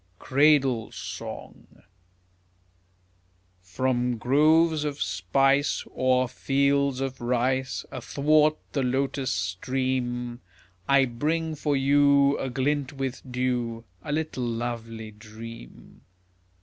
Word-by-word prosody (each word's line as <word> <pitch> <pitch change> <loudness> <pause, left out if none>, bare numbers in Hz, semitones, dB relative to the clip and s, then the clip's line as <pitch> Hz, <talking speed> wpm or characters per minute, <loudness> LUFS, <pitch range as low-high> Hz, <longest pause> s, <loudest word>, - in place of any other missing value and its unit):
CRADLE 135 -4 +3
SONG 100 +2 -9 1.8
From 120 +6 -1
groves 155 +6 +3
of 145 -1 -3
spice, 140 +1 +1
O'er 130 0 +2
fields 140 +1 +1
of 135 -1 -4
rice, 130 +2 0
Athwart 150 +4 +2
the 140 - -1
lotus 130 0 -1
stream, 120 +5 -2 0.5
I 140 -1 +5
bring 155 +7 -1
for 145 -1 0
you, 140 +1 +4
Aglint 140 +2 -1
with 135 -2 -4
dew 125 -2 -1 0.2
A 150 - -6
little 150 -4 -2
lovely 115 -2 -4
dream. 110 - -12
130 Hz, 90 wpm, -26 LUFS, 120-140 Hz, 1.8 s, I